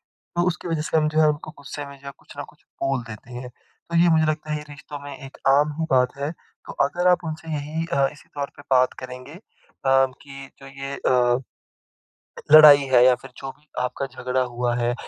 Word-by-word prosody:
तो 175 +1 -3
उसकी 175 0 -4
वज़ह 165 -2 -1
से 160 - -1
हम 155 -1 +3
जो 155 +1 +1
है 155 - +5
उनको 150 +1 -3
गुस्से 140 +1 -7
में 140 0 -12
जो 140 - -14
है 140 - -6
कुछ - - -16
न - - -4
कुछ - - -28 0.2
बोल 135 -2 0
देते 115 +2 -11
हैं। 125 +1 -7
तो 170 +6 -9
ये 175 +1 +5
मुझे 160 -1 +3
लगता 155 0 -2
है - - 0
ये 150 - -9
रिश्तों 145 0 -9
में 140 -1 -8
एक 135 0 -12
आम 145 +2 +4
ही 160 - 0
बात 125 0 +2
है। 140 +2 -2 0.4
तो - - -7
अगर 175 +5 0
आप 180 -1 +3
उनसे 160 0 -6
यही 155 +3 -3
अ, 140 0 +3
इसी 140 - -18
तौर 140 -1 -5
पे 145 - -12
बात 130 -1 +4
करेंगे 130 +3 -9
अ, 180 - -12 0.5
कि 135 +1 0
जो 135 - -12
ये 135 0 -7
अ 125 -1 +3 1.1
लड़ाई 150 -2 +10
है 125 -1 +7
या 130 0 +6
फिर 125 +1 -13
जो 135 - -6
भी 145 +3 -30
आपका 125 +2 -2
झगड़ा 130 0 -3
हुआ 120 -1 -1
है, 120 0 0
140 Hz, 225 wpm, -23 LUFS, 130-155 Hz, 1.1 s, लड़ाई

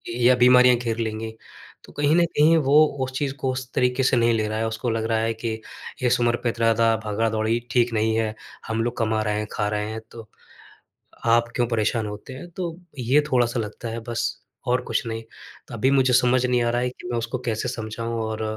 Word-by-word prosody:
या 125 +1 +4
बीमारियाँ 125 0 +6
घेर 115 -2 -3
लेंगी। 110 0 -3 0.5
तो - - -15
कहीं 145 +2 +2
न 175 - +5
कहीं, 160 0 +4
वो 150 +1 +5 0.2
उस 130 - -7
चीज़ 140 -2 -1
को 130 - +1
उस 130 -1 -6
तरीके 125 +1 +1
से 130 -1 +3
नहीं 115 0 +3
ले 110 -1 0
रहा 110 +1 -3
है। 115 - 0
उसको 110 +2 -3
लग 110 0 -1
रहा 110 - +2
है 115 +1 0
कि, 110 0 -4 0.4
"इस 125 0 +2
उम्र 120 0 +3
पे 120 - +2
इतना 115 -1 +2
ज़्यादा 115 0 +3
भागा-दौड़ी 110 +2 0
ठीक 120 -1 +2
नहीं 110 0 +1
है। 110 -1 -1 0.3
हम 115 0 -1
लोग 120 - -3
कमा 110 -1 0
रहे 105 0 -1
हैं, 105 - -4
खा 105 - -1
रहे 105 0 -2
हैं, 110 - -5
तो 115 -2 -11 1.0
आप 120 +1 +4
क्यों 120 - +2
परेशान 115 -1 0
होते 105 +5 -8
हैं?" 175 +7 -9
तो 170 -1 -5 0.2
ये 130 +5 +3
थोड़ा-सा 120 -1 +2
लगता 110 +2 -6
है, 115 - -4
बस, 115 - -2 0.3
और 125 +1 +2
कुछ - - -1
नहीं। 115 0 -4 0.5
अभी 125 +4 +2
मुझे 130 -2 +3
समझ 125 +1 +3
नहीं 125 -1 +2
आ 120 - +1
रहा 120 - 0
है 125 - +1
कि 120 - -11
मैं 120 - 0
उसको 120 +2 -3
कैसे 115 +2 -1
समझाऊँ? 115 -1 -4
और 110 0 -3
115 Hz, 225 wpm, -23 LUFS, 110-125 Hz, 1.0 s, बीमारियाँ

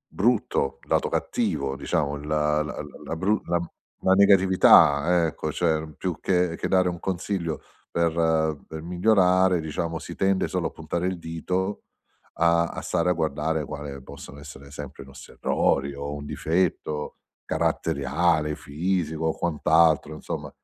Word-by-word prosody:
brutto, 105 - +1
lato - - +1
cattivo, 70 -1 -1
diciamo 70 +1 -1
il 70 0 -8
l - - -6 0.8
l-la - - -3
bru 105 +5 +1 0.6
la 95 - +4
negatività, 95 -4 +5
ecco, 80 0 -4
cioè 80 -1 -1
più 90 -4 -3
che 90 -2 +1
che - - -3
dare 95 -1 +3
un 85 -1 -5
consiglio 90 -3 -3 0.3
per 85 -1 +1 0.5
per 80 0 -7
migliorare, 90 0 +3
diciamo, 80 +1 -3
si - - -8
tende 95 -1 +1
solo - - -1
a - - -5
puntare 85 +1 -3
il 95 -1 -2
dito 90 +4 -3 0.5
a 85 0 +3
a - - -6
stare 85 +2 0
a - - +4
guardare, 80 -1 -1
quale 70 -2 -7
possono 70 +1 -11
essere 70 -1 -12
sempre 75 -1 -8
i - - -16
nostri 70 0 -13
errori 70 +1 0
o 70 +1 -5
un 75 0 -6
difetto 80 -2 -1 0.3
caratteriale, 75 +2 0
fisico 80 +1 -2
o 80 - 0
quant'altro 80 -2 +2
insomma. 75 - -6
80 Hz, 140 wpm, -25 LUFS, 75-90 Hz, 0.8 s, negatività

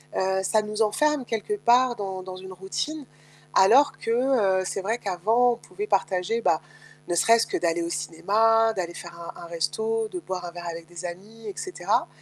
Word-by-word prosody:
heu, 190 0 +1
ça 215 +3 +2
nous 210 +1 -4
enferme 270 +6 +2
quelque 230 - -2
part 245 -3 +4
dans 190 -3 -5
dans 185 0 -7
une 190 0 -9
routine, 270 - -4 0.5
alors 245 +10 +6
que, 230 - -2 0.5
heu, - - -3
c'est 195 - -3
vrai 220 +5 -1
qu'avant 220 +6 +2
on - - -3
pouvait 415 - -7
partager, 195 - 0
bah, 160 -7 +2 0.5
ne 175 - 0
serait-ce 230 +6 +4
que - - -1
d'aller 170 0 0
au 170 - -2
cinéma, 205 +9 +2
d'aller 175 -3 -3
faire 170 -1 -9
un 170 - -9
un - - -7
resto, 440 - -1
de 370 -3 -5
boire 185 - -5
un 175 - -6
verre 175 0 -8
avec 165 0 -7
des 175 +1 -9
amis 210 +6 -8
et 205 - -4
cetera. 370 - -1
200 Hz, 195 wpm, -25 LUFS, 175-235 Hz, 0.5 s, alors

